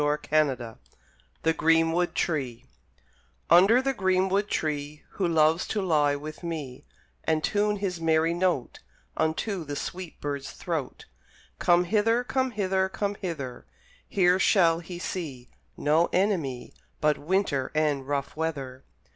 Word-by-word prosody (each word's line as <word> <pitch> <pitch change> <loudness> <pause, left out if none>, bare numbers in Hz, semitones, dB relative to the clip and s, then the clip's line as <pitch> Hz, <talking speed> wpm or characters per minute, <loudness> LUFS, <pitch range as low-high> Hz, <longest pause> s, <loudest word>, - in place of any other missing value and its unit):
Roberts 145 -5 0 0.6
THE 160 - +3
GREENWOOD 165 +2 +2
TREE 130 -8 -2 0.9
Under 200 +9 +6
the 270 0 +1
greenwood 190 -1 +1
tree 150 -4 -3
Who 190 -4 -1
loves 160 0 +3
to 215 - -1
lie 150 -5 +2
with 150 +2 -8
me, 155 -7 -6 0.4
And 155 -1 0
tune 210 +4 +1
his 190 -4 -3
merry 160 0 +2
note 175 -7 -1 0.4
Unto 170 +4 -1
the 145 -1 -5
sweet 180 +3 -6
bird's 140 -1 -4
throat, 160 -7 -4 0.5
Come 175 0 +4
hither, 225 +5 +2
come 260 +1 0
hither, 190 -4 0
come 200 +1 -2
hither; 150 -11 -6 0.4
Here 180 -1 +3
shall 170 -5 +4
he 175 +1 -8
see 145 -9 -6 0.3
No 155 +3 +3
enemy 170 -11 -1 0.3
But 150 -1 +2
winter 155 -5 0
and 145 -3 +1
rough 140 -1 -2
weather. 140 -5 -4
165 Hz, 130 wpm, -27 LUFS, 145-190 Hz, 0.9 s, Under